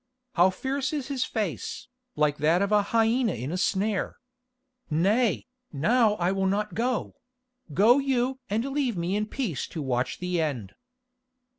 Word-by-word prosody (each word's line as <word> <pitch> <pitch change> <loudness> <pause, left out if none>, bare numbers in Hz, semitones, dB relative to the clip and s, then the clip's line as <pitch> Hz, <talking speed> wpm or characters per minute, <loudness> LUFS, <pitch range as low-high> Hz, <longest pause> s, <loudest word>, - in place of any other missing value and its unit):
How 180 +2 +5
fierce 270 +8 -2
is 285 -3 -3
his 265 -3 0
face, 215 +3 -4 0.3
like 150 -1 +2
that 160 +6 +3
of 200 - -1
a 210 -1 +5
hyena 225 +1 +2
in 125 +5 -4
a - - -2
snare. 195 +2 0 0.7
Nay, 205 +9 +2 0.3
now 215 - +3
I 180 -2 0
will 195 0 0
not 210 +2 -1
go—go 250 - 0
you 265 -1 0
and 220 +4 0
leave 275 -6 -1
me 175 +3 -1
in 210 +1 -1
peace 215 - -3
to 165 - -7
watch 125 -3 -1
the 180 -2 -1
end." 125 -11 -3
210 Hz, 150 wpm, -27 LUFS, 175-250 Hz, 0.7 s, How